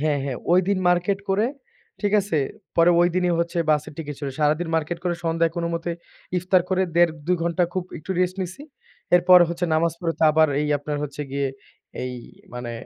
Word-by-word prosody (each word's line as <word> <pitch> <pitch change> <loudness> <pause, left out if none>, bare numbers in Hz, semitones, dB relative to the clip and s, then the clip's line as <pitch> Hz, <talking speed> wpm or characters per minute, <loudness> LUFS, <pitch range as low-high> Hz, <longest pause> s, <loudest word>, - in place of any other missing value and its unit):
হ্যাঁ, 150 -1 +1
হ্যাঁ 135 -3 -3 0.2
ঐদিন 185 +2 +3
মার্কেট 180 +3 +2
করে 205 +4 +2 0.5
ঠিক 205 -1 0
আছে? 185 -6 -1 0.4
পরে 170 +1 +6
ঐদিনই 175 0 +2
হচ্ছে 170 +1 -2
বাসের 150 0 0
টিকেট 150 -2 -5
চলে। 140 -2 -4
সারাদিন 155 +3 +1
মার্কেট 160 +2 -1
করে 175 -1 0
সন্ধ্যায় 165 0 +1
কোন 170 - -1
মতে 170 +1 -3 0.5
ইফতার 180 0 +2
করে 190 0 +2
১.৫ 170 -2 +5
২ 180 - +2
ঘন্টা 170 +1 +1
খুব 185 -1 -2
একটু 180 +5 -10
রেস্ট 185 +1 0
নিছি। 185 +10 -7 0.5
এরপর 180 +1 +7
হচ্ছে 170 +1 -2
নামাজ 165 0 +2
পড়তে 165 -2 -2
আবার 155 0 +4
এই 150 - -1
আপনার 145 +1 -4
হচ্ছে 150 0 -6
গিয়ে 140 0 -1 0.6
এই 125 0 -4 0.4
মানে 120 -1 -5
170 Hz, 180 wpm, -23 LUFS, 155-180 Hz, 0.6 s, এরপর